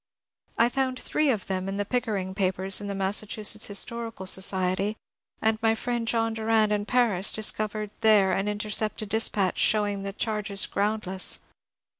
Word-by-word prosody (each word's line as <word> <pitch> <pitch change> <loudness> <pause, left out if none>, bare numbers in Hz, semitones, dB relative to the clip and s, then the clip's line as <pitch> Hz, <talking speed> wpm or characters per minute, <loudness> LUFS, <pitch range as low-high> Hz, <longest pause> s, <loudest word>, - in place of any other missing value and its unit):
I 230 - +5
found 255 0 -1
three 305 -1 0
of 220 -7 0
them 190 0 -2
in 195 - -3
the 205 - 0
Pickering 205 -6 -2
papers 190 0 0
in 205 - -5
the 200 - -3
Massachusetts 210 +2 -1
Historical 225 0 -3
Society, 190 +2 +1 0.5
and 220 0 +1
my 225 0 +3
friend 240 0 -3
John 225 -1 +1
Durand 220 -1 +2
in 205 -1 0
Paris 210 -5 +2
discovered 215 -1 0
there 210 -3 +5
an 195 +1 0
unintercepted 210 0 -1
dispatch 210 -3 +1
showing 205 -2 +2
the 195 0 -4
charges 210 -2 -1
groundless. 200 -3 0
210 Hz, 150 wpm, -26 LUFS, 195-225 Hz, 0.5 s, I